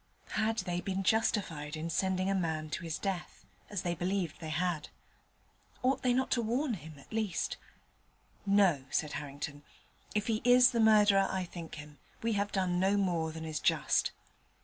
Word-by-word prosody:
Had 220 +1 0
they 175 -1 -1
been 195 0 -2
justified 170 -8 0
in 165 +2 -3
sending 185 +2 +1
a 195 - +2
man 160 -4 -1
to 180 - -3
his 165 -2 -3
death, 190 -3 -4 0.2
as 205 -4 -3
they 175 - 0
believed 175 -1 -2
they 160 - -5
had? 160 -1 -1 0.9
Ought 260 +2 +2
they 250 - +2
not 260 +2 +1
to 240 - +2
warn 245 +4 0
him, 160 -5 -8
at 140 - -15
least? 215 -4 -1 0.9
'No,' 195 -9 +3
said 150 -2 0
Harrington; 145 0 -5 0.5
'if 210 0 +1
he 220 -1 0
is 245 +1 +7
the 235 - 0
murderer 210 -3 +6
I 190 -1 -1
think 170 -2 -8
him, 150 -1 -11 0.2
we 230 0 +1
have 200 0 0
done 180 -2 0
no 195 +2 +3
more 170 -5 0
than 160 0 -7
is 155 -1 -3
just. - - +2
185 Hz, 175 wpm, -32 LUFS, 160-210 Hz, 0.9 s, is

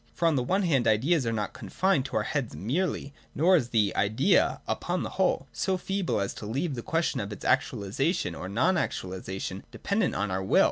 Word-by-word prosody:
For 170 - +2
on 160 - +3
the 130 - +2
one 190 +11 +1
hand 135 -9 +2
Ideas 130 +6 +3
are - - +1
not 105 -2 -2
confined 185 -9 0
to - - -2
our 105 - +1
heads 135 0 -2
merely, 145 - -2 0.2
nor 180 +5 +5
is 125 -8 +1
the 110 -4 +2
Idea, 110 - +3
upon - - -1
the - - -4
whole, - - +1
so 190 -1 0
feeble 195 - -1
as 100 0 -2
to 105 - -8
leave 140 +8 -1
the 120 - -4
question 165 -1 0
of 100 -2 -4
its 100 - -8
actualisation 120 - 0
or 90 - -6
non 165 - +2
actualisation 95 - -3
dependent 200 -1 0
on 100 -1 -1
our 95 +1 -1
will. 95 - +3
130 Hz, 205 wpm, -28 LUFS, 105-170 Hz, 0.2 s, nor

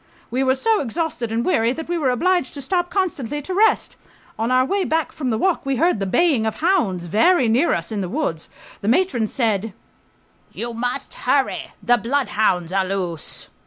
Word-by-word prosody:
We 255 +3 0
were 260 0 +3
so 440 +10 +1
exhausted 275 -3 -3
and 230 +1 -1
weary 235 -9 +2
that 320 +3 -7
we 350 - -1
were 300 -6 +1
obliged 340 +4 +1
to 280 - -6
stop 350 +4 0
constantly 295 - -2
to 370 - -4
rest. 430 +4 +2 0.4
On 225 +1 0
our 255 0 +3
way 395 +7 0
back 320 -2 0
from 265 -4 -3
the 220 - 0
walk 370 +6 +1
we 275 0 -1
heard 330 - +2
the 195 - -2
baying 270 - +2
of 220 - -2
hounds 240 - +1
very 255 - +3
near 250 +9 +3
us 170 +3 -4
in 210 -2 -2
the 180 - -3
woods. 180 - -3 0.3
The 200 - -4
matron 245 - +2
said, 220 -3 -1 0.8
"You 235 0 -5
must 245 +2 -3
hurry, - - 0
the 245 0 +4
bloodhounds 215 -8 0
are 195 0 +2
loose." 185 -4 -3
255 Hz, 195 wpm, -21 LUFS, 220-330 Hz, 0.8 s, the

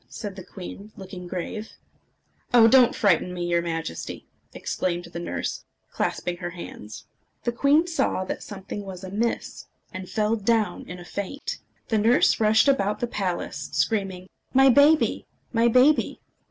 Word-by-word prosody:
said 205 -4 -6
the 190 - -8
queen, 195 +3 -9
looking 190 -2 -8
grave. 190 +4 -5 0.8
"Oh! 230 -2 +8
don't 250 0 +6
frighten 180 -3 +2
me, 175 -1 -3
your 170 0 +2
Majesty!" 165 - -5 0.3
exclaimed 175 -1 -2
the 170 0 -7
nurse, 90 - -4 0.3
clasping 175 0 -2
her 175 -1 -4
hands. 140 -11 -9 0.4
The 240 - 0
queen 285 +7 +3
saw 275 - 0
that - - -4
something 200 0 -7
was 190 -1 -8
amiss, 210 +5 -3 0.3
and 185 0 -7
fell 215 +1 +1
down 220 0 0
in 180 - -6
a 175 - -11
faint. 280 - -5 0.3
The 220 - +2
nurse 230 +4 +4
rushed 220 +3 +4
about 210 -7 +2
the - - 0
palace, 195 -6 -3
screaming, 195 -4 -1 0.3
"My 270 0 +7
baby! 285 +4 +4 0.3
my 230 0 +4
baby!" 255 +6 +4
200 Hz, 150 wpm, -25 LUFS, 180-235 Hz, 0.8 s, Oh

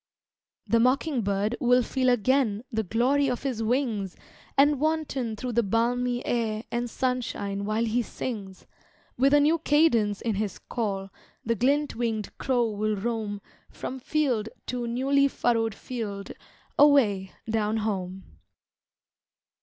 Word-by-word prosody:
The 230 - +3
mocking 260 +2 +2
bird 200 +2 0
will 250 0 +4
feel 255 +1 +1
again 245 -2 +2
The 220 -2 0
glory 255 +7 +2
of 250 +1 -3
his 255 -5 -2
wings, 225 -5 -1 0.4
And 285 0 +5
wanton 295 -7 -1
through 250 +3 -4
the 235 0 +3
balmy 245 +3 0
air 225 -2 -1
And 240 0 -1
sunshine 230 -6 -2
while 215 +2 0
he 230 +2 +1
sings, 205 -5 -6 0.5
With 270 +3 +3
a 290 - +6
new 310 +3 +3
cadence 240 -10 +3
in 230 - -1
his 205 0 -2
call, 195 -5 -3 0.3
The 230 - +2
glint 280 +5 +1
wing'd 225 -3 -2
crow 245 -4 +1
will 215 +1 -1
roam 210 -1 -3 0.3
From 265 - -6
field 250 -6 0 0.2
to 245 -1 -3
newly 275 +4 +2
furrowed 230 -5 0
field 205 -5 -5 0.5
Away 225 -10 +4
down 220 0 0
home. 190 -3 -3
235 Hz, 135 wpm, -27 LUFS, 215-260 Hz, 0.5 s, a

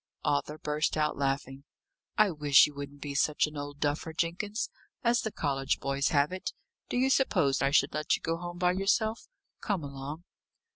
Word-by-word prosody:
Arthur 145 +1 0
burst 150 0 -1
out 150 0 +1
laughing. 135 0 -2 0.5
"I 215 -2 +5
wish 150 -3 +6
you 150 - -6
wouldn't 140 0 -8
be 145 -1 -4
such 150 +2 +2
an 150 0 -8
old 145 0 -6
duffer, 150 +2 -1
Jenkins 180 +7 -2 0.3
as 240 0 +3
the 220 - -3
college 135 -5 -1
boys 140 0 0
have 145 +1 +2
it! 185 0 -4 0.4
Do - - -1
you 265 +2 +3
suppose 145 - +2
I 135 - +3
should 140 - +3
let 150 0 +1
you - - -8
go 165 0 -1
home 175 0 -6
by 180 0 +3
yourself? 215 +4 0 0.3
Come 195 -6 -2
along." 140 +3 -7
150 Hz, 185 wpm, -30 LUFS, 140-180 Hz, 0.5 s, wish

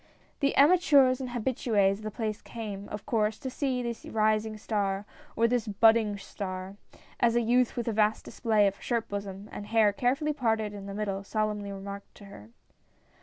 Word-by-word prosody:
The 280 -1 +1
amateurs 280 -5 +5
and 255 - -4
habitues 220 -5 +1
of - - -12
the 215 - -3
place 215 -1 -4
came, 205 -4 -7
of 210 - -7
course, 215 -4 0
to 260 - -6
see 260 -2 -1
"this 235 -1 -5
rising 215 0 0
star," 200 -2 -1 0.3
or, 230 +1 +3
"this 240 -1 0
budding 220 0 +4
star," 190 -1 -6 0.4
as 235 -1 +3
a 240 - +4
youth 245 +1 +2
with 240 - -2
a - - +1
vast 215 0 +1
display 220 -4 +2
of 200 0 -1
shirt 235 -2 -1
bosom 200 0 -5
and 205 - -7
hair 220 -2 +4
carefully 275 +7 0
parted 220 -6 0
in 200 -1 -8
the 200 - -6
middle, 200 -2 -2
solemnl}'^ 210 +1 -1
remarked 200 0 -8
to 205 - -13
her. 110 - -12
215 Hz, 180 wpm, -28 LUFS, 200-240 Hz, 0.4 s, amateurs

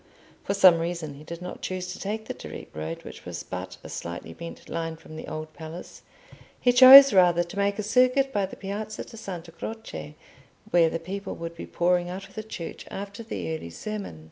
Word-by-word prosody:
For 200 - -1
some 185 -4 +7
reason, 165 -3 -3
he 140 +2 -12
did 170 +2 -8
not 180 - -7
choose 180 -1 -4
to - - -10
take 215 +2 -3
the - - -4
direct - - -10
road, 80 +1 -5
which - - -10
was - - -6
but - - -6
a - - -8
slightly 85 -1 -6
bent 170 - -9
line 165 -1 -3
from 155 -1 -13
the 155 - -7
Old 155 0 -6
Palace; 160 +3 -9 0.6
he 245 - +4
chose 265 +1 +11
rather 175 -2 +5
to 175 - -10
make 200 0 +1
a 215 - -2
circuit 255 +5 +3
by 200 -2 +1
the - - -10
Piazza 210 +2 -5
di - - -12
Santa 175 -6 -7
Croce, 120 - -7 0.6
where 170 -2 +5
the 165 - -2
people 190 +4 -6
would 170 0 -6
be - - -8
pouring 175 0 +1
out 190 +2 -6
of 195 - -20
the 215 - -4
church 205 -6 -7
after 200 +2 -6
the 215 -7 -4
early 85 - -7
sermon. 200 - -6
180 Hz, 210 wpm, -26 LUFS, 165-205 Hz, 0.6 s, chose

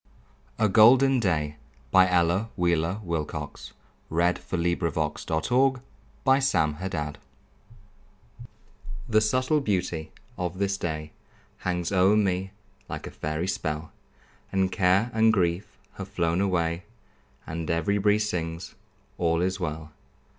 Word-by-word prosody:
A 110 - +3
Golden 125 +5 +6
Day 75 -8 0 0.4
An 95 0 +7
Ella 90 +4 +2
Wheeler 85 +1 +1
Wilcox 75 -4 -4 0.4
Poem 80 - -2
A 85 +1 +4 0.6
GOLDEN 80 0 -2 1.5
DAY 75 -5 -3 1.9
The 110 -3 +3
subtle 130 +7 +2
beauty 90 - -2 0.3
of 90 0 -3
this 100 0 0
day 75 -2 -4 0.5
Hangs 90 -1 -2
o'er 95 +2 +4
me 95 -2 0 0.4
like - - -5
a - - -7
fairy 75 +3 -3
spell, 80 -4 -3 0.6
And 95 -1 +1
care 95 +4 +2
and 110 0 +4
grief 90 -2 -1 0.2
have 95 - -6
flown 85 -2 0
away, 85 -3 0 0.6
And 80 0 -5
every 85 +5 +1
breeze 105 +1 +2
sings, 85 -1 -4 0.5
"All 85 -1 +2
is 95 +1 -1
well." 80 -2 -4
90 Hz, 110 wpm, -26 LUFS, 80-100 Hz, 1.9 s, An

